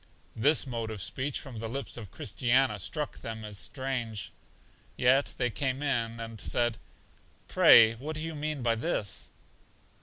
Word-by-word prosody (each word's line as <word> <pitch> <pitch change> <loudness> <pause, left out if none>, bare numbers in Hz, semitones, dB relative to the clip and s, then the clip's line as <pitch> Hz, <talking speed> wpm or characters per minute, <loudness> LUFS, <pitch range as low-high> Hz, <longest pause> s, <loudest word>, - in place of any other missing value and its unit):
This 145 +8 +4
mode 115 -4 -4
of 110 -2 -6
speech 130 +9 -2
from 125 -5 -7
the 115 0 -4
lips 135 +4 -4
of 110 -5 -7
Christiana 125 +2 +1
struck 150 - -3
them 110 -1 -6
as 105 -2 -5
strange. 125 -6 -3 0.7
Yet 130 +3 +3
they 125 -2 0
came 130 +6 -1
in, 115 -5 0
and 115 -2 -6
said, 120 -2 0 0.7
Pray 115 -1 +7
what 145 +7 -6
do 155 - -4
you 165 0 -4
mean 150 -3 -3
by 115 -1 +3
this? 110 -3 -2
120 Hz, 155 wpm, -29 LUFS, 110-135 Hz, 0.7 s, Pray